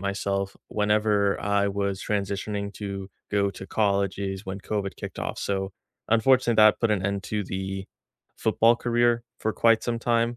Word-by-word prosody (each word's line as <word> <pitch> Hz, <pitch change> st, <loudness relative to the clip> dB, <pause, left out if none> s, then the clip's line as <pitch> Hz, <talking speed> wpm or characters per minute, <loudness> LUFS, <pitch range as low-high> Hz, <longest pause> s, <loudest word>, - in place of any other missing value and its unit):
myself, 100 Hz, 0 st, -2 dB
whenever 105 Hz, -1 st, +2 dB
I 100 Hz, 0 st, +1 dB
was 100 Hz, 0 st, -2 dB
transitioning 100 Hz, 0 st, -2 dB
to 100 Hz, -2 st, -6 dB, 0.2 s
go 100 Hz, -1 st, +2 dB
to 95 Hz, 0 st, -9 dB
college 100 Hz, -3 st, +1 dB
is 95 Hz, 0 st, -4 dB
when 95 Hz, +1 st, -5 dB
COVID 100 Hz, -1 st, -3 dB
kicked -, -, -7 dB
off, -, -, -3 dB
so, 95 Hz, -1 st, -2 dB, 0.4 s
unfortunate, 120 Hz, +1 st, +4 dB
that 110 Hz, 0 st, +6 dB
put 115 Hz, -2 st, +2 dB
an 95 Hz, -3 st, +1 dB
end 100 Hz, 0 st, -2 dB
to 105 Hz, -1 st, -2 dB
the 95 Hz, +1 st, -4 dB, 0.5 s
football 115 Hz, +1 st, +4 dB
career 120 Hz, 0 st, +2 dB, 0.2 s
for 110 Hz, -, -1 dB
quite 115 Hz, 0 st, +4 dB
some 120 Hz, -1 st, -1 dB
time. 115 Hz, 0 st, +1 dB
100 Hz, 160 wpm, -26 LUFS, 100-110 Hz, 0.5 s, that